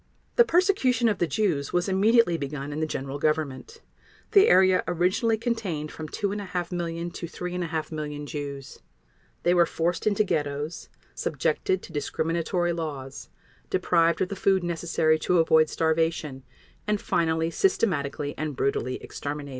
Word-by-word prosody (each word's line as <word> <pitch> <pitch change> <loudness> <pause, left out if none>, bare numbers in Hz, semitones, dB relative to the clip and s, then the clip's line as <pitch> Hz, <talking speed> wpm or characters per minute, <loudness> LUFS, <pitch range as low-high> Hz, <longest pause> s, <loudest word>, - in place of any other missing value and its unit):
The 475 - +7
persecution 335 - +2
of 210 - -1
the 175 - +2
Jews 160 -5 0
was 175 +1 +1
immediately 200 0 +4
begun 145 -1 -4
in 150 - -4
the 155 - 0
General 140 -1 -4
Government. 155 - -2 0.5
The 405 +1 +7
area 185 - +5
originally 185 +6 +1
contained 210 -10 -3
from 155 -1 -7
2½ 195 -3 -3
million 170 -1 -3
to 170 - -6
3½ 175 -3 -4
million 150 -1 -5
Jews. 140 -3 -6 0.6
They 175 - +4
were 175 -1 +4
forced 170 +4 -1
into 210 0 +3
ghettos, 150 -3 -3 0.2
subjected 380 -1 -1
to 170 - -11
discriminatory 170 +4 -1
laws, 145 -5 -6 0.4
deprived 170 -3 +2
of 185 - +1
the 200 - -4
food 195 -3 +2
necessary 165 -2 +1
to 180 +3 +1
avoid 160 -1 +4
starvation, 160 -4 0 0.5
and 210 -1 +1
finally 160 -2 0
systematically 145 - 0
and 155 -2 -3
brutally 130 -1 -1
exterminated. 145 0 -5
165 Hz, 140 wpm, -26 LUFS, 150-190 Hz, 0.6 s, The